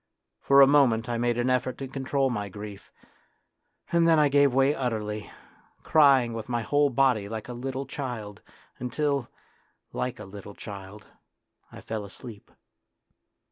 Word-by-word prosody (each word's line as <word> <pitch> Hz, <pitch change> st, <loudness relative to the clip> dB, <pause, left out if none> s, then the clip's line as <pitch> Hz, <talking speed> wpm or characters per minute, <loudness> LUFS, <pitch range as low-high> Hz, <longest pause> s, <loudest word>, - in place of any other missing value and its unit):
For 140 Hz, 0 st, +5 dB
a -, -, +10 dB
moment 135 Hz, -6 st, +3 dB
I 120 Hz, -1 st, -2 dB
made 120 Hz, 0 st, 0 dB
an 120 Hz, +1 st, +1 dB
effort 130 Hz, 0 st, 0 dB
to 135 Hz, -, -5 dB
control 135 Hz, 0 st, -1 dB
my 105 Hz, -4 st, -3 dB
grief; 105 Hz, +1 st, -10 dB, 1.0 s
and 170 Hz, -1 st, +3 dB
then 165 Hz, -1 st, +5 dB
I 150 Hz, -1 st, +4 dB
gave 140 Hz, 0 st, +4 dB
way 135 Hz, +3 st, +3 dB
utterly, 110 Hz, -6 st, -3 dB, 0.5 s
crying 135 Hz, -6 st, +4 dB
with 115 Hz, 0 st, -6 dB
my 120 Hz, -1 st, -1 dB
whole 145 Hz, +4 st, +2 dB
body 125 Hz, -6 st, +2 dB
like 110 Hz, -1 st, -6 dB
a 125 Hz, -, -6 dB
little 135 Hz, +2 st, -4 dB
child, 115 Hz, -9 st, -6 dB, 0.4 s
until, 140 Hz, +1 st, -1 dB, 0.6 s
like 125 Hz, -2 st, -3 dB
a 105 Hz, -, -8 dB
little 100 Hz, +1 st, -10 dB
child, 100 Hz, +1 st, -10 dB, 0.7 s
I -, -, -11 dB
fell 110 Hz, -2 st, -5 dB
asleep. 100 Hz, +2 st, -11 dB
125 Hz, 150 wpm, -27 LUFS, 110-135 Hz, 1.0 s, a